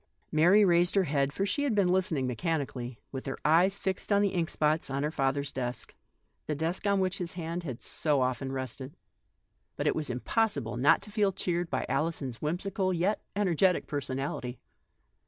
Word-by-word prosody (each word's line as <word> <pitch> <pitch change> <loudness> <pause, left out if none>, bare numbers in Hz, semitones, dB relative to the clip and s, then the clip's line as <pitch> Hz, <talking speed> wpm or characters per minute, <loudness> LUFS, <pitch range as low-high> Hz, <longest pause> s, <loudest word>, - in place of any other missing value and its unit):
Mary 180 +7 +6
raised 175 0 +3
her 195 - +4
head, 140 -3 +1
for 195 +7 -1
she 205 +9 0
had 280 -6 +1
been 200 -3 +3
listening 180 -6 +1
mechanically, 130 -3 -2
with 135 0 -6
her 135 - -3
eyes 175 +6 +4
fixed 190 +1 -3
on 200 0 +4
the 200 - +3
ink 170 -3 0
spots 155 0 +1
on 135 +1 -1
her 150 - 0
father's 140 -1 0
desk, 125 -2 -4 0.5
the 150 - -1
desk 165 +7 -2
on 200 -1 +3
which 190 +1 0
his 175 -2 -4
hand 170 0 -4
had 130 -8 -6
so 150 -3 +1
often 130 +1 -2
rested. 130 +1 -5 0.8
But - - -2
it - - +2
was 155 -3 -3
impossible 140 - 0
not 125 +4 +4
to 210 - -7
feel 205 -2 +2
cheered 175 -2 -2
by 130 - -1
Ali 155 +6 0
son's 130 -6 -6
whimsical 185 +4 -1
yet 185 +4 0
energetic 185 -2 +2
personality. 135 -3 -3
160 Hz, 185 wpm, -29 LUFS, 135-185 Hz, 0.8 s, Mary